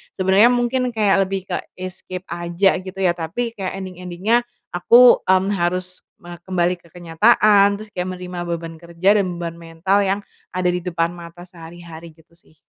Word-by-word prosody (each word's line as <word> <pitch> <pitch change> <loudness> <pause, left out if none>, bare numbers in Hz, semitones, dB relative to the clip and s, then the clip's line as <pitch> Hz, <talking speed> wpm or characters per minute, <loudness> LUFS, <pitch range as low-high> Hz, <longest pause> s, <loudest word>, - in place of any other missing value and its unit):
sebenernya 190 +4 +4
mungkin 245 0 0
kayak 195 -3 +2
lebih 195 -1 -3
ke - - 0 0.2
escape 185 0 -8
aja 175 +3 +1
gitu 190 +1 -9
ya, 175 - +4
tapi 175 +8 -4
kayak 195 -5 -5
ending-ending-nya 185 +6 -1 0.2
aku, 240 +8 +6
mmm, 190 +1 +3
harus 180 -1 -3 0.2
me 175 -1 -10
kembali 180 0 -1
ke 170 - -22
kenyataan, 200 +4 +3
terus 215 +1 -11
kayak 180 -3 -4
menerima 180 -1 -7
beban 165 -1 -5
kerja 175 +5 +1
dan 195 - 0
beban 170 -1 -6
mental 165 +4 0
yang 195 +1 0 0.4
ada 180 -1 +1
di 180 - -2
depan 170 -1 -2
mata 175 0 -11
sehari-hari, 170 -2 -12
gitu 160 +1 -25
sih. 170 -1 -27
180 Hz, 165 wpm, -20 LUFS, 170-195 Hz, 0.4 s, aku